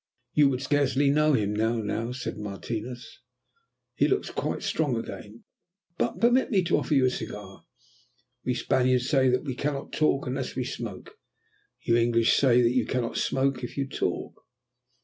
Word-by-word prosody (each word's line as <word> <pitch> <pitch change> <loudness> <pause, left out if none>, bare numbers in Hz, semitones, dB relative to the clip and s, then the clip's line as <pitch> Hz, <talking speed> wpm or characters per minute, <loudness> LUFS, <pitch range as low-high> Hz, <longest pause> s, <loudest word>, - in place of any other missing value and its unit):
"You 145 -2 +5
would 130 0 -2
scarcely 140 -1 +2
know 150 +1 +3
him 105 -5 +1
now," 110 +1 -1
said 125 0 -5
Martinos. 115 - -6 0.7
"He - - +2
looks - - 0
quite - - -3
strong 145 -7 0
again. 115 0 -8 0.6
But 120 - -1
permit 245 +3 +3
me 195 -5 +2
to 175 - +2
offer 150 - 0
you 135 -2 +4
a - - +4
cigar. 105 -4 -7 0.8
We 125 - -1
Spaniards 125 0 +1
say 135 -3 +3
that 125 0 +1
we 135 -4 -3
cannot 140 +1 -3
talk 150 -3 +1
unless 130 +1 -3
we 130 - -1
smoke; - - -7 0.6
you 115 - +3
English 115 -1 +3
that 130 -4 +5
you 125 -1 +3
cannot 125 -3 -2
smoke 135 -1 0
if 120 - -6
you 135 -1 -1
talk." - - -3
125 Hz, 160 wpm, -27 LUFS, 115-140 Hz, 0.8 s, You